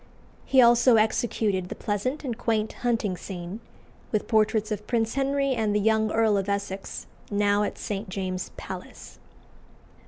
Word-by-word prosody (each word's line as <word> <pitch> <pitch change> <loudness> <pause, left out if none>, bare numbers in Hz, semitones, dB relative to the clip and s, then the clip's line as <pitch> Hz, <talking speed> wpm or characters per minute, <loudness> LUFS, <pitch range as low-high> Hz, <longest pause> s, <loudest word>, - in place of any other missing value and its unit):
He 265 -2 +6
also 240 +1 +6
executed 215 -4 +1
the - - -5
pleasant 235 +9 -2
and 250 -5 -3
quaint 220 -2 -1
hunting 230 -6 0
scene, 180 +2 -7 0.5
with 215 - -1
portraits 220 -1 +2
of 210 0 -4
Prince 230 -2 0
Henry 275 0 +1
and 220 -4 0
the - - +3
young 220 +1 +2
Earl 220 -2 +3
of 195 0 -2
Essex, 200 -1 -4 0.2
now 205 0 +2
at 210 - -2
St. 205 0 -4
James's 185 -1 -3
Palace. - - -9
215 Hz, 150 wpm, -26 LUFS, 200-235 Hz, 0.5 s, He